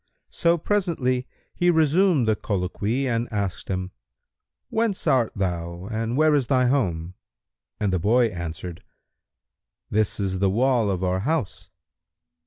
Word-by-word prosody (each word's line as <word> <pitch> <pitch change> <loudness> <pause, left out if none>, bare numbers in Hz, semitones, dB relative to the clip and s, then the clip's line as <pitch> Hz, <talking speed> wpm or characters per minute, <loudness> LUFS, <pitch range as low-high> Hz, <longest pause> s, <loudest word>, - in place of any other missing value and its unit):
So 170 -1 +2
presently 155 -10 0 0.3
he 175 - +2
resumed 160 - +3
the 110 - +3
colloquy 105 +6 -2
and 120 -1 -1
asked 100 -4 -3
him, 95 -1 -3 0.8
"Whence 220 -3 0
art 125 -4 +3
thou 85 -2 -3
and 115 +3 -2
where 155 0 +4
is 140 -5 +2
thy 130 -1 +3
home?"; 90 -10 0 0.7
and 100 -3 0
the 90 - +1
boy 120 +7 +3
answered, 85 -1 -6 1.1
"This 110 0 +1
is 95 -2 -1
the 100 0 +3
wall 120 +1 +2
of 95 -1 -1
our 95 0 +1
house." 140 0 -2
110 Hz, 135 wpm, -24 LUFS, 95-140 Hz, 1.1 s, where